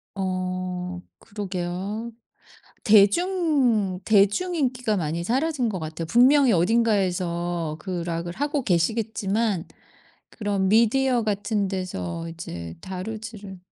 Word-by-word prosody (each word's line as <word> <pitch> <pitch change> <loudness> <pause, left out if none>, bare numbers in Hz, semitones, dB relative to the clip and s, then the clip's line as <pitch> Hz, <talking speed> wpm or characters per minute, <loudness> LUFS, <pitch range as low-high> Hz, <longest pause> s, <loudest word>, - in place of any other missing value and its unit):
어 185 -1 -3 0.2
그러게요. 200 +2 -4 0.7
대중 230 - +3
대중 215 - +3
인기가 250 -6 0
많이 170 0 -2
사라진 265 - 0
것 190 -4 -3
같아요. 160 +1 -5
분명히 255 - +5
어딘가에서 175 -5 +1
그 175 0 -4
락을 170 0 -3
하고 290 -1 -1
계시겠지만 205 +1 0 0.6
그런 200 -3 -1
미디어 235 +4 +3
같은 205 -1 -1
데서 165 - -4
이제 85 - -7
다루지를 205 +1 -7
200 Hz, 235 characters per minute, -24 LUFS, 180-230 Hz, 0.7 s, 분명히